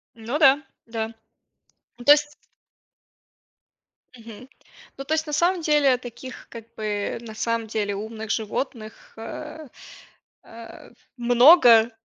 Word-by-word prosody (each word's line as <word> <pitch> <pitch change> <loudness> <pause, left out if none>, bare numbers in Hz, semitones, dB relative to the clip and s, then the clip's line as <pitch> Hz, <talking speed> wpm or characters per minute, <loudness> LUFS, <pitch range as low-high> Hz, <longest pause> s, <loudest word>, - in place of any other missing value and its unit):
Ну 235 +5 -4
да, 280 -2 +5 0.3
да. 225 -1 -5 0.8
Ну 240 - -12
то 290 - +7
есть 295 0 -2 1.8
мгм, 230 +2 -13 0.5
ну 275 - -7
то 310 - -1
есть 315 +1 -2
на 300 - -6
самом 350 +4 +1
деле 295 -4 +3
таких, 250 +1 -11
как 230 -2 -10
бы, 210 -2 -3
на 220 -2 -10
самом 230 +1 -2
деле, 205 -2 -2
умных 220 +1 -7
животных, 220 0 -5
а, 300 +7 -9 0.8
а, 230 0 -13 0.3
много, 240 -1 +6
235 Hz, 120 wpm, -23 LUFS, 220-290 Hz, 1.8 s, то